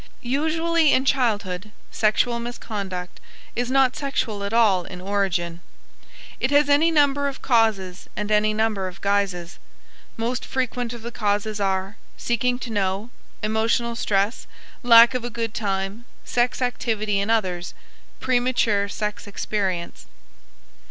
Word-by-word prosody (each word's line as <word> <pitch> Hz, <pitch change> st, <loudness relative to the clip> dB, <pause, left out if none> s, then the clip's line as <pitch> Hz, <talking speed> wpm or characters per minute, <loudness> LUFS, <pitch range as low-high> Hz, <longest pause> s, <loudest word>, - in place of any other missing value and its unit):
Usually 320 Hz, +4 st, +2 dB
in 260 Hz, -, +2 dB
childhood, 210 Hz, -8 st, 0 dB, 0.2 s
sexual 235 Hz, +2 st, +1 dB
misconduct 200 Hz, -6 st, -5 dB, 0.4 s
is 245 Hz, +1 st, -1 dB
not 265 Hz, -1 st, +3 dB
sexual 230 Hz, -7 st, -2 dB
at 200 Hz, -, -3 dB
all 215 Hz, -6 st, +4 dB
in 180 Hz, +1 st, -9 dB
origin. 180 Hz, -3 st, -1 dB, 0.8 s
It -, -, +1 dB
has 290 Hz, 0 st, +4 dB
any 295 Hz, +4 st, +5 dB
number 285 Hz, -3 st, +3 dB
of 275 Hz, -, -6 dB
causes 215 Hz, -6 st, +1 dB
and 210 Hz, 0 st, -3 dB
any 210 Hz, 0 st, +3 dB
number 215 Hz, -3 st, 0 dB
of 180 Hz, -1 st, -9 dB
guises. 195 Hz, -3 st, -1 dB, 0.6 s
Most 235 Hz, +2 st, -2 dB
frequent 250 Hz, -2 st, -2 dB
of 235 Hz, -2 st, -9 dB
the 235 Hz, -, -5 dB
causes 210 Hz, -1 st, -1 dB
are: 195 Hz, +1 st, -1 dB, 0.2 s
seeking 245 Hz, +1 st, 0 dB
to 235 Hz, -, -5 dB
know, 200 Hz, +2 st, -1 dB, 0.3 s
emotional 225 Hz, +2 st, +1 dB
stress, 205 Hz, 0 st, 0 dB, 0.3 s
lack 235 Hz, -1 st, +8 dB
of 250 Hz, -2 st, -2 dB
a 240 Hz, -, -3 dB
good 230 Hz, -1 st, -3 dB
time, 195 Hz, +2 st, -3 dB, 0.2 s
sex 245 Hz, +1 st, 0 dB
activity 215 Hz, -4 st, -1 dB
in 200 Hz, +2 st, -1 dB
others, 185 Hz, -6 st, -1 dB, 0.4 s
premature 245 Hz, -5 st, +1 dB
sex 210 Hz, 0 st, -4 dB
experience. 195 Hz, -4 st, -3 dB
220 Hz, 130 wpm, -23 LUFS, 200-245 Hz, 0.8 s, lack